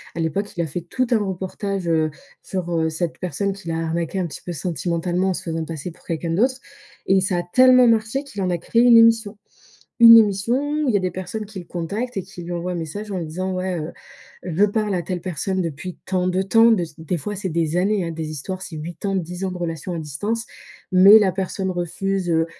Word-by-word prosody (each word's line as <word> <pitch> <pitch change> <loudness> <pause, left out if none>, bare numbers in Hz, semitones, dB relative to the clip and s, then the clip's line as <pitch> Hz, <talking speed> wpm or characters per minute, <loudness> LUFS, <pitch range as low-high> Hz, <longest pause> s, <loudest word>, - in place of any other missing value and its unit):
À - - -4
l'époque, 180 +6 -2
il 170 - -1
a 165 - -1
fait 170 +4 -4
tout 255 +9 -2
un 235 - +4
reportage, 190 -1 -3
heu, 160 -1 +2 0.3
sur, 185 -2 -4
heu, 160 -1 +1
cette 165 +1 -3
personne 200 +2 -2
qui 190 -3 -9
l'a 165 0 -1
arnaqué 165 +3 -2
un 180 - -1
petit 155 - -9
peu 175 - -4
sentimentalement 175 +3 -1
en - - +1
se - - -5
faisant 165 -1 -3
passer 160 +1 -6
pour - - -21
quelqu'un 165 0 -3
d'autre. 255 +7 +1 0.5
Et 190 0 +4
ça 185 -1 0
a - - -2
tellement 255 +1 +7
marché 225 +4 +1
qu'il 210 -8 -7
en 180 - 0
a 175 - -1
créé 230 +7 +2
une 245 -1 +7
émission. 225 -2 +4 0.6
Une 230 0 +11
émission 210 +1 +2 0.3
où - - 0
il 240 - +1
y - - +6
a - - +1
des 185 -2 -2
personnes 215 +4 -5
qui 200 -2 -8
le - - -11
contactent 205 +9 -4
et 195 - -1
qui 185 -2 -10
lui 170 - -8
envoient 175 +1 -3
un - - -4
message 195 +6 -5
en 185 - -2
lui 170 - -4
disant: 185 +4 -3
«Ouais, 185 -1 -2
heu, 155 +2 -5 0.5
je 180 +2 +2
parle 210 0 0
à 175 - -1
telle 180 0 -4
personne 185 +2 -2
depuis 170 +3 -5
tant 185 -1 0
de 185 +1 +1
temps». 225 +4 +5
De 205 -5 +2
c'est 155 -2 -14
des 165 +3 -2
fois 205 +8 -5
c'est 190 -1 -3
des 165 0 0
années, 195 +1 +1
hein. 165 - -3
Des 160 -1 -5
histoires, 185 +6 -5
c'est 175 - -8
8 165 +5 -8
ans, 195 -1 0
10 180 0 -3
ans 190 - -2
de 180 - -6
relation 170 0 -4
à - - -4
distance, 205 +11 -3 0.5
mais 195 +4 +8
la 200 -3 +3
personne 190 0 -3
refuse, 185 +2 -2
heu 165 0 +2
185 Hz, 245 wpm, -22 LUFS, 170-205 Hz, 0.6 s, Une